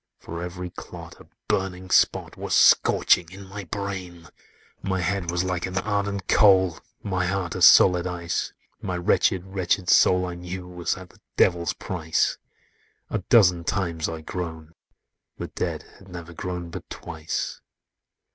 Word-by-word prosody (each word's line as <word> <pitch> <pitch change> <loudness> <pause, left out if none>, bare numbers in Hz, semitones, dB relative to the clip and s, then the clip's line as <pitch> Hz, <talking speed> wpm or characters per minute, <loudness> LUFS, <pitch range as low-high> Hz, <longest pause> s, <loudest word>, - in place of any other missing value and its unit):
For 85 +1 -7
every 90 0 -6
clot, - - -10
a - - -16 0.2
burning 95 -1 -2
spot - - +2
Was - - -2
scorching 85 -2 +4
in 100 +1 -10
my 100 +1 -8
brain! 90 -3 -6 0.5
"My 95 -1 -1
head 90 0 -1
was 85 +1 0
like 90 -1 -2
an 95 0 -5
ardent 100 -1 -2
coal, 95 -5 +5 0.2
My 95 -3 -1
heart 90 -2 -2
as 90 -1 +5
solid 90 -1 +6
ice; 85 -1 -3 0.3
My 90 -1 -3
wretched, 90 0 +2
wretched 95 -1 -1
soul, 90 0 +5
I 90 - -5
knew, 90 +1 -7
Was 90 -1 -3
at 95 -1 -11
the - - -25 0.2
Devil's 85 -2 +2
price: 80 -3 -1 0.7
A 105 - 0
dozen 90 -4 +4
times 85 -3 -1
I 80 -1 -6
groaned: 80 -1 -6 0.6
the - - -6
dead - - -3 0.2
Had 95 - -17
never 85 -2 -9
groaned 90 0 -5
but - - -8
twice! 80 -1 -5
90 Hz, 150 wpm, -24 LUFS, 85-95 Hz, 0.7 s, solid